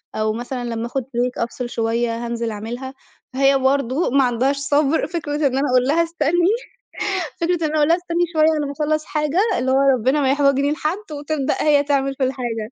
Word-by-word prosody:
أو 215 0 0
مثلًا 245 +2 -5
لمّا 230 -1 -3
آخُد 255 +2 -3
Break 250 0 -2
أفصِل 240 +1 -5
شوية 230 0 -1
هانزِل 235 -1 -3
أعملها." 240 +5 -6 0.4
فهي 275 +1 +3
برضه 270 +3 +1
ما 275 +1 +3
عندهاش 255 +3 +1
صَبر 285 +2 +1
فكرة 315 -4 -4
إن 300 - -2
أنا 285 0 +1
أقول 255 -1 +4
لها 330 +4 +3
استنِّي 335 +2 +1 0.9
فكرة 335 -1 +1
إن - - 0
أنا 310 - -1
أقول 295 -1 +3
لها 335 - +4
استنّي 350 -1 -1
شوية 310 0 +4
على 295 -1 -1
ما 280 - -4
اخلّص 305 +1 -1
حاجة، 300 +2 -1 0.2
اللي 260 +2 0
هو 265 - +3 0.2
ربنا 260 +6 +1
ما 265 -1 +2
يحوجني 280 0 +2
لحد، 330 +5 -3
وتبدأ 290 -1 -2
هي 290 -2 +4
تعمل 275 -1 0
في 265 - -2
الحاجة. 240 -4 -3
275 Hz, 200 wpm, -20 LUFS, 245-305 Hz, 0.9 s, أقول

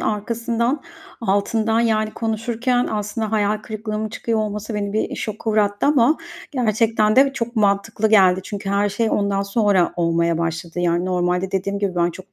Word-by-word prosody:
arkasından, 235 +5 -1 0.4
altından, 220 +2 +1
yani, 215 -2 +1
konuşurken 235 +3 -1
aslında 215 +1 -3
hayal 210 0 +1
kırıklığımın 215 0 -4
çıkıyor 225 +1 -2
olması 210 +1 -3
beni 200 -1 -2
bir 220 - -1
şoka 215 +1 -3
uğrattı 205 +1 +1
ama 290 +1 +4 0.3
gerçekten 220 -3 +1
de 270 0 +5
çok 235 -1 -4
mantıklı 210 +1 +1
geldi. 190 -3 +5
Çünkü 200 -1 -5
her 200 +1 +2
şey 220 +2 -1
ondan 200 -1 0
sonra 200 -3 +2
olmaya 170 -1 +1
başladı. 165 +1 -3
Yani, 175 0 +1
normalde 180 0 0
dediğim 195 +1 -2
gibi 195 -3 -1
ben 175 0 +2
çok 190 +3 -13
210 Hz, 155 wpm, -21 LUFS, 195-225 Hz, 0.4 s, de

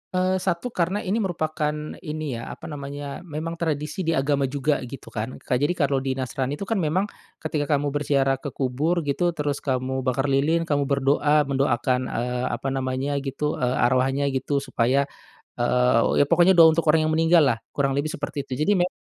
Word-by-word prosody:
Eee, 185 +1 +2
satu 185 +6 -2
karena 185 +2 -1
ini 200 +5 0
merupakan 155 -6 -1 0.2
ini 150 -7 -4
ya, - - -7
apa - - -31
namanya, 140 0 -6
memang 165 +2 -5
tradisi 155 +2 -2
di 165 - +2
agama 140 0 +1
juga 145 +2 0
gitu 130 +2 -10
kan, 115 +3 -4
Kak, 125 - -2
jadi 145 +6 +1
kalau 140 -4 +1
di 130 0 -2
Nasrani 130 +1 -2
tuh 175 - -6
kan 200 +1 -1
memang 185 +5 0 0.3
ketika 145 -1 0
kamu 145 0 -1
berziarah 135 -2 +1
ke 145 - -6
kubur 150 +7 0
gitu, 170 +4 0
terus 145 -2 -2
kamu 130 -1 -1
bakar 135 +2 +1
lilin, 155 +5 +2
kamu 145 -3 0
berdoa, 145 +2 +3
mendoakan, 130 -2 0
eee, 125 +1 -2
apa 125 +3 -5
namanya, 135 +2 -1
gitu, 140 +2 -3
eee, 125 0 +1
arwahnya 130 +3 +2
gitu, 135 +1 -1
supaya 130 +1 +1 0.5
eee, 125 +1 +3
ya - - +5
pokoknya 175 +5 +5
doa 165 -2 +8
untuk 165 - +1
orang 155 0 +3
yang 155 - +1
meninggal 165 +1 +5
lah, - - -12
kurang 140 -1 0
lebih 145 +2 -1
seperti 145 -1 -4
itu. 130 -1 -6
Jadi, 170 +7 +2
me 175 0 +2
145 Hz, 190 wpm, -24 LUFS, 135-160 Hz, 0.5 s, doa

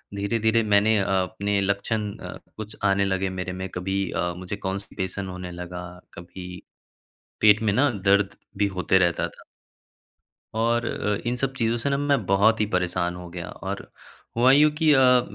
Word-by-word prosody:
धीरे-धीरे 110 +3 +1
मैंने 105 +1 +3
अ, - - +1 0.2
अपने 100 +1 -1
लक्षण 100 +2 -1
अ, - - -8 0.2
कुछ 110 -1 -7
आने 100 0 +3
लगे 95 0 0
मेरे 90 0 -4
में 95 +1 -4
कभी 95 +2 -2
अ, 90 0 -1
मुझे 95 +2 -5
कॉन्स्टिपेशन 95 0 -4
होने 90 -1 -6
लगा 90 0 -7 0.3
कभी 90 +1 -9 0.8
पेट 105 0 +6
में 105 -2 +1
ना 145 +6 +3
दर्द 100 -1 +2 0.2
भी 100 0 +2
होते 95 +1 +3
रहता 85 -1 +1
था। - - -16 1.1
और 115 +1 +1
अ, 105 -2 -1
इन 125 - -1
सब 135 +1 -2
चीज़ों 115 -1 +1
से 120 +4 -1
ना 140 - +1
मैं 140 -6 +1
बहुत 100 +4 +3
ही 105 - +3
परेशान 90 -1 0
हो 90 -1 -9
गया 85 0 -7
और - - -6 0.5
हुआ 125 +2 +6
यू 150 +2 +6
की 160 -1 +4
अ, 125 -2 +6
100 Hz, 170 wpm, -25 LUFS, 95-115 Hz, 1.1 s, पेट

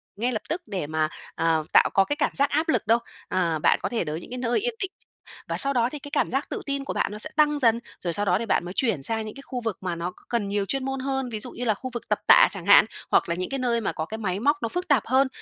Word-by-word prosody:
ngay 240 +5 -1
lập 220 - -2
tức 340 +2 -2
để 185 -8 -3
mà, 155 0 0 0.3
ờ, 160 -1 +1
tạo - - +6
có 195 - +5
cái 290 - -1
cảm 295 - 0
giác 280 0 +2
áp 310 +4 0
lực 215 - +1
đâu. 230 +1 +4 0.3
Ờ, 170 -4 0
bạn - - +3
có - - -2
thể 235 - -1
đới 155 +1 -4
những - - -12
cái 250 - -4
nơi 245 - +1
yên 485 +2 -2
tĩnh 385 -1 -2 0.6
và - - -2
sau 275 0 +5
đó 240 -1 +2
thì 300 - -6
cái 285 +1 -10
cảm - - +1
giác 270 +3 -1
tự - - -4
tin 280 -1 -2
của - - -3
bạn - - 0
nó 210 - -7
sẽ - - -1
tăng 295 -1 +3
dần, 230 -3 +3 0.2
rồi 170 -2 -2
sau 205 +4 +1
đó 185 0 +2
thì 230 - -3
bạn 180 - +1
mới 180 - -6
chuyển 225 - 0
sang 220 +9 -2
những 215 - -8
cái 275 - -9
khu 250 -2 -4
vực 225 -4 -3
mà 180 -2 -2
nó 170 +2 -3
c - - -24 0.2
cần 230 -4 0
nhiều 200 0 -1
chuyên 270 +5 -2
môn 270 0 -2
hơn, 265 -1 -2
ví 220 -2 -4
dụ 250 - -6
như 245 - -5
là 220 - +3
khu 255 +6 -7
vực 240 - -4
tập 210 - +1
tạ - - +8
chẳng 190 -4 -4
hạn, 200 +1 +8 0.3
hoặc - - +3
là 170 - 0
những 185 +1 -3
cái 270 -1 -2
nơi 235 -2 +1
mà 215 - -1
có 160 - -4
cái 220 +6 -6
máy 195 -3 -2
móc 290 +6 +2
nó 230 - -1
phức 360 +1 -3
tạp 275 -7 +3
hơn, 265 +2 +3
230 Hz, 325 wpm, -25 LUFS, 190-270 Hz, 0.6 s, tạ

